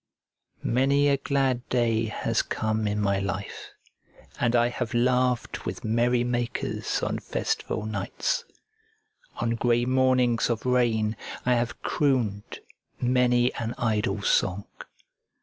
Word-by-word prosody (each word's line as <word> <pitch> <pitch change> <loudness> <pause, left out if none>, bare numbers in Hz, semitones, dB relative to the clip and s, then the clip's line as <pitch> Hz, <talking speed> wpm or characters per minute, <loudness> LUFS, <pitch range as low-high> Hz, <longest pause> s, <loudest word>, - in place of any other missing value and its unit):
Many 140 +4 +3
a 140 - +3
glad 135 -3 0
day 115 -2 +1
has 110 - 0
come 110 0 -1
in 105 0 -1
my 100 -1 +1
life, 100 0 -5 0.7
and 120 0 +2
I 120 0 +4
have 120 -1 -4
laughed 125 0 +1
with - - -5
merrymakers 120 +1 0
on - - -1
festival 105 - -2
nights. 110 - -2 0.9
On 115 - -1
grey 120 +1 +1
mornings 130 -2 +2
of 115 0 -2
rain 115 -4 +2 0.3
I 125 - +4
have 120 -1 -2
crooned 120 -8 0 0.4
many 125 0 +2
an 115 0 -4
idle 105 -3 0
song. 95 +2 +1
120 Hz, 115 wpm, -26 LUFS, 110-125 Hz, 0.9 s, I